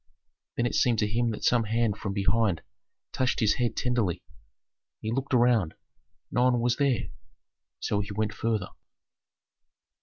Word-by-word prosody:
Then 120 - +1
it 120 - -1
seemed 120 -2 +3
to 105 - +1
him 115 +3 0
that 110 - -5
some 120 -2 +3
hand 115 -1 +1
from 105 -2 -4
behind 100 -3 +1 0.5
touched 130 -1 0
his 110 -2 +2
head 120 - 0
tenderly. 110 -9 0 0.8
He 110 - -3
looked 135 +3 -2
around. 120 - +3 0.6
No 125 +1 +2
one 125 -1 +3
was 120 0 +1
there; 140 -5 +1 0.7
so 105 - -1
he 100 - -3
went 110 +1 -1
farther. 110 -4 -1
115 Hz, 150 wpm, -27 LUFS, 105-120 Hz, 0.8 s, seemed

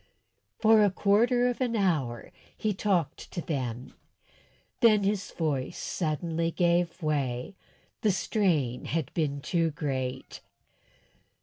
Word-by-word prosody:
For 220 -1 +5
a 205 - +5
quarter 235 +6 +3
of 245 +1 -2
an 240 -2 0
hour 150 - 0 0.3
he 215 -1 0
talked 185 -5 -1
to 180 - -3
them, 130 -7 -4 0.9
then 215 -4 +5
his 200 -1 -1
voice 145 -6 -2
suddenly 165 0 -2
gave 175 0 +1
way, 140 0 -1 0.5
the 215 - +3
strain 175 - 0
had 160 -4 -2
been 145 -4 -1
too 165 +2 +1
great. 130 -4 -4
170 Hz, 115 wpm, -28 LUFS, 140-200 Hz, 0.9 s, For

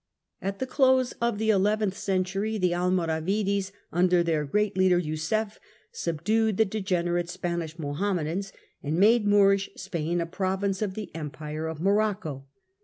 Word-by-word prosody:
At 195 +1 -3
the 260 - -2
close 260 -1 +3
of 235 -3 +1
the 220 +1 +2
eleventh 205 0 +1
century 195 +3 -1
the 180 -3 +1
Almoravides, 185 +3 0 0.2
under 180 0 +3
their 160 -3 0
great 210 +7 0
leader 185 -1 +4
Yusuf, 180 +7 -2 0.3
subdued 215 - 0
the 220 - +4
degenerate 175 -4 -1
Spanish 170 -2 -4
Mohammedans, 170 +4 -2 0.3
and 150 +3 -2
made 210 +3 +5
Moorish 200 -1 +4
Spain 175 -2 -2
a 170 - 0
province 190 +2 -1
of 200 -3 -2
the 215 -2 -6
Empire 155 0 -5
of 160 -1 -5
Morocco. 195 -7 0
190 Hz, 140 wpm, -27 LUFS, 170-210 Hz, 0.3 s, made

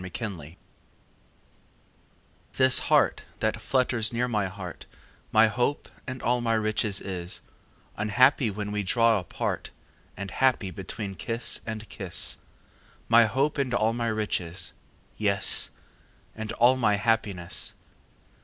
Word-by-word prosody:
XXIII 90 -5 -7 2.0
This 130 -1 +5
heart - - +3 0.2
that - - -1
flutters 125 -4 +1
near 120 +1 0
my 105 -5 0
heart 95 -2 -9 0.4
My 110 +1 +6
hope 120 +6 -1 0.2
and 130 -1 -6
all 120 +1 +1
my 115 -1 +1
riches 110 -2 0
is, 90 -2 -5 0.6
Unhappy 120 +4 +3
when 105 0 -4
we 105 0 -1
draw 115 +2 +3
apart 90 - -4 0.5
And 100 -1 -6
happy 125 -7 +1
between 95 +2 -6
kiss 115 +5 -1
and 110 -1 -5
kiss: 95 -5 -2 0.7
My 115 0 +7
hope 140 +6 0
and 130 -3 0
all 110 0 +2
my 120 0 -2
riches 105 -6 0 0.5
yes! 100 -2 +3 0.7
And 110 -1 -5
all 125 +2 +4
my 105 -5 +3
happiness. 100 -5 -1
110 Hz, 120 wpm, -27 LUFS, 100-120 Hz, 2.0 s, My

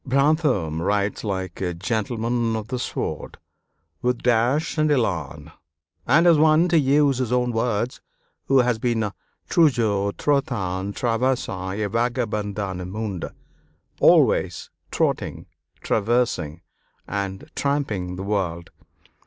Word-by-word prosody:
Brantôme 135 - +1
writes 100 +2 0
like 95 -4 -4
a 90 -2 -2
"gentleman 115 +4 -1
of 110 0 -5
the 125 -1 -2
sword," - - -4 0.6
with 125 0 -1
dash 125 +5 +2
and 155 0 +3
élan, 95 - -1 0.5
and 155 +7 +5
as 170 -3 +6
one, 155 +2 +5
to 170 -2 +4
use 140 -1 +3
his 125 -3 -1
own 125 -1 +1
words, 115 +1 -1 0.4
who 135 -1 +4
has 120 -2 0
been 110 -3 0 0.4
"toujours 110 -10 +2
trottant, 100 -9 -1
traversant, 115 -6 -1
et 105 -2 -2
vagabondant 105 -5 -2
le 90 - -5
monde" 100 -2 -4 0.7
(always - - +3 0.2
trotting, - - -1 0.4
traversing, 105 -8 0 0.5
and 100 -1 -4
tramping 110 -11 -1
the 95 - -5
world). 90 -5 -2
115 Hz, 115 wpm, -23 LUFS, 100-130 Hz, 0.7 s, as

